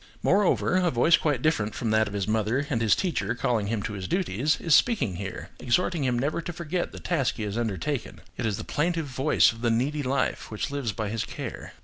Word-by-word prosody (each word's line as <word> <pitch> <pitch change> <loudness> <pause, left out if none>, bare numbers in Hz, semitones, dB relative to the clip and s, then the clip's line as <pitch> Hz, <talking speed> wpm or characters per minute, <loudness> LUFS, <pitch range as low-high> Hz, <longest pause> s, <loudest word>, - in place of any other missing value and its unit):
Moreover, 190 -2 +3
a 180 -1 +3
voice 155 +5 +5
quite 145 -6 0
different 110 -10 +1
from 115 - -1
that 110 0 +3
of 100 - -6
his 100 -1 -1
mother 110 +5 +1
and 115 -4 +1
his 110 -2 +4
teacher 120 - -1
calling 115 -4 0
him 105 -1 -2
to 105 - -4
his 95 -2 -5
duties, 150 - 0
is 165 - +1
speaking 145 - +3
here, 95 0 -6
exhorting 165 +5 +1
him 125 -1 +1
never 145 +7 -1
to 175 - -5
forget 175 +1 -3
the - - -9
task 145 -8 0
he 110 - -4
has 105 -1 -3
undertaken. 120 +4 -2 0.2
It 115 - -2
is 105 -2 -1
the 110 - -5
plaintive 165 +1 -1
voice 135 +2 +3
of 115 0 -11
the 120 - +2
needy 135 +6 0
life 135 0 -1
which 110 +6 -3
lives 140 -6 -2
by 105 0 -3
his 110 +1 -2
care. - - -7
125 Hz, 230 wpm, -26 LUFS, 110-155 Hz, 0.2 s, voice